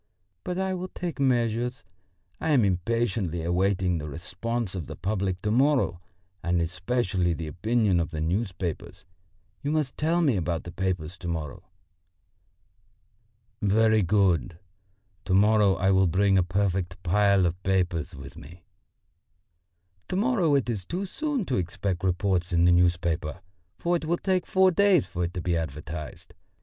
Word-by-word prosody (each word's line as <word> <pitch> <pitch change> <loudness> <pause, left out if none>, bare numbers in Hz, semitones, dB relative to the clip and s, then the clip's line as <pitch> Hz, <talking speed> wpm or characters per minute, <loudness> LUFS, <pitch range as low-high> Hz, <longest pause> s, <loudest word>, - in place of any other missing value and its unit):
But 180 - -3
I 190 0 -1
will 185 0 -4
take 175 -4 -6
measures. 125 0 0 0.6
I 160 - -2
am 125 -7 +4
impatiently 95 -2 -1
awaiting 90 0 +1
the 75 0 -6
response 95 - -4
of 90 -6 -5
the - - -7
public 95 0 -2
to 105 - 0
morrow, 130 - +2 0.4
and 85 +1 0
especially 90 +1 0
the 80 0 -5
opinion 100 +4 +1
of 85 +1 -1
the 80 -2 -5
newspapers. 90 +1 -3 0.6
You 145 - -2
must 150 -3 -1
tell 165 +3 +2
me 140 -10 +2
about 85 -2 -2
the 85 - -8
papers 90 -2 -3
to 90 - -6
morrow." 80 -4 -5 2.0
"Very 110 +2 +3
good; 90 - +1 0.7
to 95 - +1
morrow 105 -1 +4
I 95 +1 +2
will 95 -1 +4
bring 95 +3 +3
a 95 - +5
perfect 90 -1 -1
pile 100 +1 +3
of 90 +2 -2
papers 90 -4 0
with 70 0 -10
me." 85 +4 -13 1.4
"To - - -3
morrow 195 - +2
it 135 -4 +1
is 110 -6 -2
too 180 - -4
soon 285 +2 -2
to 130 - -1
expect 90 +1 -2
reports 90 0 0
in 85 0 +3
the 90 - +6
newspapers, 85 -2 +1 0.4
for 175 0 +1
it 160 - -7
will 170 +2 +1
take 185 -1 0
four 190 0 +4
days 190 -3 +4
for 90 0 -3
it 85 - -5
to 90 - -2
be 85 0 0
advertised. 80 0 -6
95 Hz, 155 wpm, -26 LUFS, 85-120 Hz, 2.0 s, the